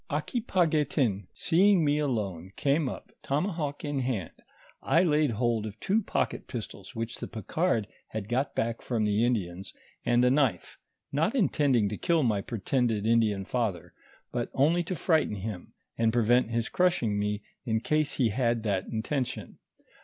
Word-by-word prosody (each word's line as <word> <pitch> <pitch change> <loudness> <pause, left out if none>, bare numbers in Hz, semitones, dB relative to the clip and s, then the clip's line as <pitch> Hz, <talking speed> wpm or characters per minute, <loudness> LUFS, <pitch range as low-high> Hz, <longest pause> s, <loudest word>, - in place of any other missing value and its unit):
Aquipaguetin 150 - 0
seeing 185 0 +3
me 145 +1 +2
alone 100 - -2
came 145 0 +1
up, - - -8
tomahawk 150 -1 -2
in 145 -1 -1
hand: 120 -10 -2 0.5
I 170 - +3
laid 150 -3 +3
hold 115 -1 0
of 105 +1 -9
two 210 +4 +1
pocket 70 - -2
pistols, - - -7
which 115 +1 -4
the - - -5
Picard 115 - -1 0.2
had 110 -2 -5
got 130 +4 -1
back 115 0 -1
from 115 -4 -1
the 105 +2 +2
Indians, 95 -6 -2 0.3
and 120 +1 +3
a 125 - +4
knife, 130 - 0 0.3
not 160 - +1
intending 140 - +3
to 105 - -4
kill 165 -3 +2
my 105 -5 +1
pretended 115 0 -1
Indian 110 -4 +2
father, 95 -9 -2 0.4
but 120 -1 -2
only 155 +6 +3
to 185 - -3
frighten 160 - +1
him, 100 -2 -6 0.3
and 115 -1 +3
prevent 120 +1 +3
his 115 0 -1
crushing 125 - +1
me, 105 0 -1 0.2
in 110 -3 0
case 155 +5 0
he 125 -5 +2
had 115 0 0
that 100 -4 -1
intention. 125 +4 -3
120 Hz, 155 wpm, -28 LUFS, 105-150 Hz, 0.5 s, a